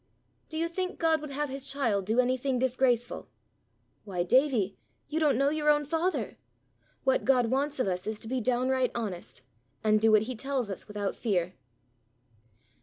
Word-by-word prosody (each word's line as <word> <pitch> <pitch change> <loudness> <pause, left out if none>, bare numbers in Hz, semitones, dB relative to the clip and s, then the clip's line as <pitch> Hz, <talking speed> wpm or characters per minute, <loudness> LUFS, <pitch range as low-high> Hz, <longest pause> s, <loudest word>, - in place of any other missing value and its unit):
"Do 315 - -5
you 330 +1 +1
think 365 +2 -3
God 320 -2 +2
would 300 - -6
have 290 +1 -2
his 270 +1 -5
child 230 -9 0
do 225 +3 +2
anything 255 +1 +1
disgraceful? 250 -1 0 0.7
Why, 185 -4 -2
Davie, 240 -2 +2 0.3
you 310 +2 -1
don't 295 -6 +3
know 275 +2 +3
your 300 -1 +1
own 295 0 +4
Father! 330 +5 -1 0.6
What - - +2
God 250 -3 +3
wants 280 +2 0
of 255 - +1
us 180 0 -2
is 215 -1 -3
to - - -7
be 255 +1 -1
down 250 +2 +1
right 260 -1 +2
honest, 195 - -5 0.4
and 215 -1 +3
do 225 0 +5
what 215 -1 +5
he 255 +3 -5
tells 260 -2 -2
us 190 - -7
without 205 -2 -3
fear." 185 -5 -1
255 Hz, 180 wpm, -29 LUFS, 215-285 Hz, 0.7 s, do